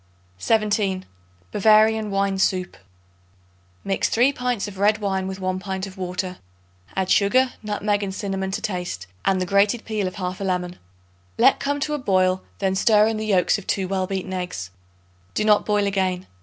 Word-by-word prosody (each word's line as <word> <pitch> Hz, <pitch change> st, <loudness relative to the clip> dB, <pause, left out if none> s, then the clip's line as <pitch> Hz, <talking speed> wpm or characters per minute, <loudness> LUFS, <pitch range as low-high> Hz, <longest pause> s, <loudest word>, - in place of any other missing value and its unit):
17. 205 Hz, -, +1 dB, 0.5 s
Bavarian 215 Hz, +1 st, +4 dB
Wine 195 Hz, -1 st, 0 dB
Soup. 185 Hz, -1 st, 0 dB, 1.1 s
Mix 195 Hz, -1 st, 0 dB
3 250 Hz, +5 st, +3 dB
pints 250 Hz, -5 st, -2 dB
of 195 Hz, -2 st, -9 dB
red 210 Hz, +1 st, +4 dB
wine 190 Hz, -2 st, -2 dB
with 190 Hz, 0 st, -5 dB
1 185 Hz, 0 st, -2 dB
pint 190 Hz, 0 st, -4 dB
of 190 Hz, -1 st, -10 dB
water. 185 Hz, 0 st, -4 dB, 0.6 s
Add 190 Hz, -1 st, 0 dB
sugar, 250 Hz, +6 st, +3 dB
nutmeg 210 Hz, -1 st, -1 dB
and 200 Hz, -1 st, -3 dB
cinnamon 195 Hz, -2 st, -3 dB
to 200 Hz, +3 st, -3 dB
taste 180 Hz, -, -3 dB, 0.2 s
and 190 Hz, -1 st, +2 dB
the 185 Hz, -, 0 dB
grated 200 Hz, +5 st, +2 dB
peel 215 Hz, -3 st, -1 dB
of 185 Hz, -, -6 dB
half 185 Hz, -1 st, -4 dB
a -, -, -1 dB
lemon. 180 Hz, -1 st, -2 dB, 0.6 s
Let -, -, +5 dB
come 285 Hz, +1 st, -1 dB
to 300 Hz, -, -1 dB
a 295 Hz, -, -1 dB
boil; 185 Hz, -5 st, +2 dB, 0.2 s
then 190 Hz, -1 st, 0 dB
stir 210 Hz, +2 st, +4 dB
in 220 Hz, 0 st, 0 dB
the 215 Hz, 0 st, -3 dB
yolks 195 Hz, 0 st, +3 dB
of 200 Hz, -, -14 dB
2 190 Hz, -2 st, 0 dB
well 190 Hz, -1 st, -1 dB
beaten 190 Hz, -1 st, -4 dB
eggs. 180 Hz, -, -4 dB, 0.6 s
Do 215 Hz, -, +1 dB
not 210 Hz, -1 st, +4 dB
boil 210 Hz, -1 st, +2 dB
again. 190 Hz, -2 st, -1 dB
195 Hz, 180 wpm, -23 LUFS, 185-210 Hz, 1.1 s, Let